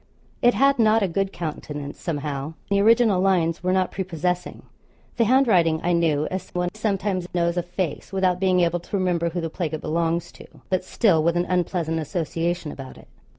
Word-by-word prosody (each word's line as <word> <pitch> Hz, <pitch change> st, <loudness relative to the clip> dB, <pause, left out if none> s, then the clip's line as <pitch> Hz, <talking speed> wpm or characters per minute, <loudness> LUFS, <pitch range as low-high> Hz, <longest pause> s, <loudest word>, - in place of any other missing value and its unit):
It 240 Hz, 0 st, +4 dB
had 275 Hz, -1 st, +3 dB
not 220 Hz, -1 st, +4 dB
a -, -, +2 dB
good 195 Hz, +2 st, -1 dB
countenance, 150 Hz, -4 st, -6 dB
somehow. 145 Hz, -1 st, -4 dB, 0.2 s
The 200 Hz, 0 st, +3 dB
original 220 Hz, -3 st, +4 dB
lines 175 Hz, -4 st, +1 dB
were 185 Hz, +1 st, 0 dB
not 185 Hz, -1 st, +1 dB
prepossessing. 180 Hz, -1 st, -3 dB, 0.5 s
The 230 Hz, -, +3 dB
handwriting 200 Hz, -11 st, +3 dB
I 175 Hz, -, +1 dB
knew 155 Hz, -3 st, +1 dB
as 185 Hz, 0 st, -4 dB
one 180 Hz, 0 st, 0 dB
sometimes 200 Hz, -4 st, -1 dB
knows 170 Hz, 0 st, +1 dB
a 175 Hz, -, +1 dB
face, 175 Hz, -3 st, -4 dB
without 185 Hz, -2 st, +1 dB
being 185 Hz, -1 st, +3 dB
able 175 Hz, 0 st, +1 dB
to 200 Hz, -, -4 dB
remember 175 Hz, -3 st, 0 dB
who 175 Hz, +1 st, -3 dB
the 165 Hz, -1 st, -4 dB
plague 160 Hz, -3 st, -3 dB
it 155 Hz, -, -7 dB
belongs 170 Hz, +2 st, -1 dB
to; -, -, -14 dB, 0.2 s
but, 185 Hz, -1 st, 0 dB
still, 185 Hz, -4 st, +2 dB
with 170 Hz, +1 st, +2 dB
an 175 Hz, -, +1 dB
unpleasant 175 Hz, -3 st, -1 dB
association 165 Hz, 0 st, -2 dB
about 135 Hz, -1 st, -9 dB
it. -, -, -17 dB
175 Hz, 190 wpm, -23 LUFS, 165-190 Hz, 0.5 s, It